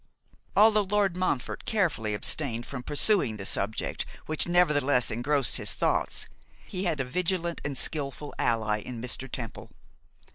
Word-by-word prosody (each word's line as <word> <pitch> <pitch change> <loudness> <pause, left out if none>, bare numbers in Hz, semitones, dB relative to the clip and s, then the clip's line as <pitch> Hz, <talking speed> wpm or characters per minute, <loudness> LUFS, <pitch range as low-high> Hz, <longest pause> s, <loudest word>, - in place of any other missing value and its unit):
Although 215 0 +6
Lord 200 -3 +2
Montfort 180 -9 -1
carefully 155 - 0
abstained 120 +1 0
from 130 -3 -6
pursuing 145 - +2
the 95 - -6
subject 100 +2 0 0.2
which 155 +1 +2
nevertheless 145 -7 +3
engrossed 130 +2 +1
his - - -1
thoughts, - - 0 0.4
he 190 0 -3
had 165 -5 0
a - - +1
vigilant 170 +4 -1
and 140 -3 -3
skilful 145 -1 -3
ally 110 -2 +1
in 120 +2 -7
Mr. 125 +2 -4
Temple. 115 -4 -6
145 Hz, 140 wpm, -28 LUFS, 120-175 Hz, 0.4 s, Although